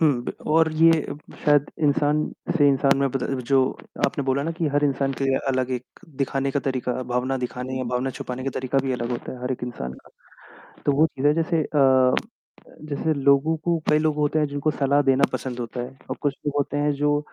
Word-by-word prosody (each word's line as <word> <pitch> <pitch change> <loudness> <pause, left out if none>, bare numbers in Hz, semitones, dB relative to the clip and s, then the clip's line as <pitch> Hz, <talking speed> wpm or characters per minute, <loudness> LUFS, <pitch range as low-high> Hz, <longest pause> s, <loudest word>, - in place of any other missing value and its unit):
हुँ 160 - +5 0.2
ब - - -3 0.2
और 160 0 +4
ये 165 +1 +6 0.5
शायद 145 -1 +3
इंसान 145 +1 +2 0.3
से 145 -2 +5
इंसान 135 0 +3
में 140 - +2
बदल 135 0 -2
जो 135 - +5 0.5
आपने 145 -6 -3
बोला 135 +1 +1
ना 165 - -2
कि 165 -1 -2
हर 145 +1 +1
इंसान 135 -1 0
के 135 - -1
लिए 135 -1 +2
अलग 130 -1 0
एक 125 0 -7 0.2
दिखाने 135 0 -1
का 140 - 0
तरीका 130 -2 -2 0.2
भावना 130 +2 0
दिखाने 125 +1 -5
या 130 - -2
भावना 125 +2 0
छुपाने 125 +1 -5
का 135 - -1
तरीका 130 +1 0
भी 135 -1 -1
अलग 120 -1 -3
होता 120 - -4
है 125 -1 -10
हर 125 - -1
एक 125 - -7
इंसान 65 - -5
का। - - -19 0.8
तो - - +4
वो 155 - +6
चीज़ें 145 0 +1
जैसे 165 -1 +1
अ, 150 - -4
अ, 130 -2 +5 0.7
जैसे 155 +2 0
लोगों 140 +2 +3
को 170 +2 0
कई 150 - +5
लोग 155 -1 +1
होते 150 +1 +1
हैं 150 - +1
जिनको 145 +2 -1
सलाह 140 0 +2
देना 135 +1 +2
पसंद 125 -2 -4
होता 120 +1 -4
है 130 +2 -8
और - - -2
कुछ 145 -2 +1
लोग 145 - 0
होते 145 0 -1
हैं 145 0 +2
जो 145 +1 +1
140 Hz, 220 wpm, -24 LUFS, 130-150 Hz, 0.8 s, ये